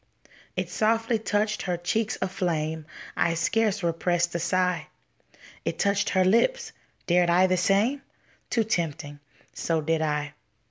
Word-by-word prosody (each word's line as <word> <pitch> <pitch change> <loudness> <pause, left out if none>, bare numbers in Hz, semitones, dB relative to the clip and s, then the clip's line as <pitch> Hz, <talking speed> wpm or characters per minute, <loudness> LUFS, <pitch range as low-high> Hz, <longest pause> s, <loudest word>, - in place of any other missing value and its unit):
It - - -3
softly 225 +1 +1
touched 215 0 0
her 180 -2 -1
cheeks 215 +5 -1
aflame. 160 -4 -2 0.3
I 165 - +1
scarce 205 +3 +1
repressed 170 +1 0
a 170 - -1
sigh. 180 -2 0 0.8
It - - -2
touched 200 +1 +1
her 185 -1 +3
lips. 235 - +2 0.3
Dared 175 0 +3
I 180 +2 +5
the 185 0 +2
same? 205 +10 +2 0.5
Too 230 - +2
tempting; 160 -8 -3 0.3
so 165 -1 -1
did 160 +1 0
I. 150 -2 -1
180 Hz, 135 wpm, -26 LUFS, 165-215 Hz, 0.8 s, I